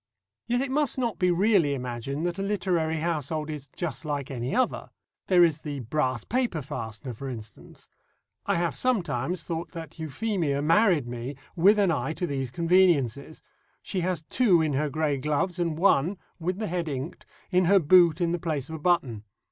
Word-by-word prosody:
Yet 245 Hz, +1 st, +1 dB
it 270 Hz, -1 st, -2 dB
must 290 Hz, -2 st, +1 dB
not 235 Hz, -4 st, -1 dB
be 180 Hz, -, +3 dB
really 180 Hz, -5 st, +3 dB
imagined 125 Hz, +4 st, -4 dB
that 175 Hz, +2 st, -2 dB
a -, -, -1 dB
literary 175 Hz, -6 st, 0 dB
household 155 Hz, -1 st, -2 dB
is 145 Hz, -2 st, -7 dB
just 155 Hz, 0 st, -5 dB
like 145 Hz, -2 st, -3 dB
any 125 Hz, -1 st, -3 dB
other. 255 Hz, +1 st, 0 dB, 0.4 s
There 180 Hz, -2 st, +6 dB
is 160 Hz, -3 st, +2 dB
the 145 Hz, -3 st, -5 dB
brass 130 Hz, -1 st, -1 dB
paper 235 Hz, -, -1 dB
fastener, 115 Hz, -1 st, -6 dB
for 135 Hz, +4 st, -6 dB
instance. 110 Hz, -4 st, -10 dB, 0.6 s
I -, -, +2 dB
have 170 Hz, 0 st, 0 dB
sometimes 175 Hz, -, -1 dB
thought 165 Hz, +1 st, -5 dB
that 165 Hz, -1 st, -9 dB
Euphemia 160 Hz, -1 st, -1 dB
married 165 Hz, -, +4 dB
me 120 Hz, +3 st, -5 dB, 0.2 s
with 195 Hz, +5 st, +5 dB
an 200 Hz, -4 st, +3 dB
eye 150 Hz, 0 st, -1 dB
to 180 Hz, -, -3 dB
these 135 Hz, -5 st, -3 dB
conveniences. 160 Hz, -4 st, +2 dB, 0.4 s
She 190 Hz, -, -2 dB
has 180 Hz, -2 st, -1 dB
two 190 Hz, -1 st, +3 dB
in 155 Hz, -2 st, +1 dB
her 150 Hz, +2 st, 0 dB
grey 150 Hz, -2 st, 0 dB
gloves, 155 Hz, +6 st, -1 dB
and 165 Hz, -3 st, -1 dB
one 185 Hz, 0 st, +3 dB, 0.2 s
(with 180 Hz, +2 st, -2 dB
the 215 Hz, -, -3 dB
head 175 Hz, -3 st, -2 dB
inked) 140 Hz, +3 st, -6 dB, 0.2 s
in 180 Hz, 0 st, +3 dB
her 200 Hz, +3 st, +5 dB
boot 175 Hz, -1 st, +5 dB
in 170 Hz, -2 st, +1 dB
the 175 Hz, -, -1 dB
place 155 Hz, -5 st, -3 dB
of 160 Hz, -, -5 dB
a -, -, -12 dB
button. 145 Hz, -, +1 dB
160 Hz, 185 wpm, -27 LUFS, 140-180 Hz, 0.6 s, There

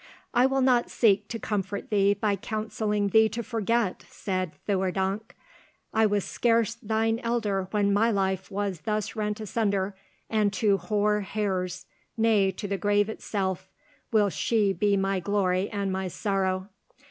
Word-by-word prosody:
"I 250 Hz, +1 st, +5 dB
will 270 Hz, 0 st, +1 dB
not 250 Hz, -2 st, +3 dB
seek 205 Hz, -3 st, +3 dB
to 230 Hz, -, -4 dB
comfort 200 Hz, -1 st, -3 dB
thee 200 Hz, -1 st, +3 dB
by 205 Hz, 0 st, 0 dB
counselling 210 Hz, 0 st, -2 dB
thee 220 Hz, +2 st, +5 dB
to 235 Hz, +1 st, -4 dB
forget," 225 Hz, -2 st, -1 dB
said 185 Hz, -4 st, -3 dB
Theurdank. 195 Hz, +2 st, -1 dB, 0.6 s
"I 220 Hz, 0 st, +4 dB
was 205 Hz, -2 st, 0 dB
scarce 230 Hz, -2 st, +1 dB
thine 225 Hz, 0 st, 0 dB
elder 215 Hz, -6 st, -1 dB
when 200 Hz, -1 st, +1 dB
my 220 Hz, +3 st, +3 dB
life 190 Hz, -3 st, -1 dB
was 200 Hz, -3 st, -2 dB
thus 215 Hz, 0 st, -1 dB
rent 210 Hz, -1 st, -2 dB
asunder, 200 Hz, -2 st, -1 dB, 0.3 s
and 215 Hz, -2 st, +1 dB
to 200 Hz, +1 st, +2 dB
hoar 210 Hz, +3 st, +1 dB
hairs, 190 Hz, -2 st, -2 dB, 0.3 s
nay, 220 Hz, -4 st, +3 dB
to 195 Hz, +2 st, -5 dB
the 200 Hz, -1 st, -2 dB
grave 205 Hz, 0 st, +2 dB
itself, 190 Hz, -3 st, -3 dB, 0.4 s
will 210 Hz, -3 st, +3 dB
she 210 Hz, -2 st, +1 dB
be 200 Hz, +2 st, +2 dB
my 195 Hz, 0 st, 0 dB
glory 185 Hz, 0 st, 0 dB
and 200 Hz, -2 st, -2 dB
my 190 Hz, 0 st, -2 dB
sorrow. 190 Hz, +1 st, -1 dB
205 Hz, 150 wpm, -27 LUFS, 195-220 Hz, 0.6 s, I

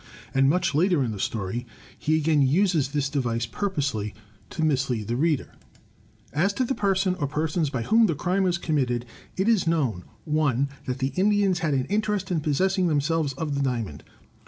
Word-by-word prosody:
And 135 Hz, 0 st, +4 dB
much 175 Hz, 0 st, +1 dB
later 170 Hz, -1 st, +3 dB
in 120 Hz, -, -2 dB
the 105 Hz, -, -6 dB
story 110 Hz, +4 st, -3 dB, 0.3 s
he 155 Hz, +1 st, +1 dB
again 155 Hz, -1 st, +2 dB
uses 160 Hz, +1 st, +3 dB
this 140 Hz, -1 st, 0 dB
device, 120 Hz, -5 st, -1 dB
pur 200 Hz, -, -2 dB
posely 135 Hz, -, -2 dB, 0.3 s
to 160 Hz, -, -3 dB
mislead 130 Hz, -8 st, 0 dB
the 120 Hz, -, -1 dB
reader: 150 Hz, +1 st, 0 dB, 0.8 s
"As 190 Hz, +7 st, +2 dB
to 255 Hz, -, 0 dB
the 265 Hz, -, -1 dB
person, 195 Hz, -4 st, +1 dB
or 145 Hz, -, 0 dB
persons, 155 Hz, +2 st, -1 dB
by 130 Hz, -4 st, -3 dB
whom 225 Hz, -, +4 dB
the 165 Hz, -, 0 dB
crime 180 Hz, +6 st, 0 dB
was 175 Hz, -2 st, +1 dB
committed: 130 Hz, -8 st, -1 dB, 0.3 s
It 190 Hz, +3 st, +1 dB
is 220 Hz, -7 st, +3 dB
known 135 Hz, -, 0 dB, 0.2 s
(1) 140 Hz, -3 st, +1 dB, 0.2 s
that 125 Hz, 0 st, -2 dB
the 135 Hz, 0 st, -2 dB
Indians 195 Hz, -1 st, +2 dB
had 155 Hz, -4 st, 0 dB
an 130 Hz, -1 st, 0 dB
interest 205 Hz, -1 st, -1 dB
in 165 Hz, -3 st, +1 dB
possessing 185 Hz, +5 st, +1 dB
them 150 Hz, -3 st, +2 dB
selves 155 Hz, -1 st, 0 dB
of 150 Hz, +2 st, -3 dB
the 140 Hz, -, -1 dB
Diamond. 115 Hz, -, -2 dB
150 Hz, 190 wpm, -25 LUFS, 130-180 Hz, 0.8 s, And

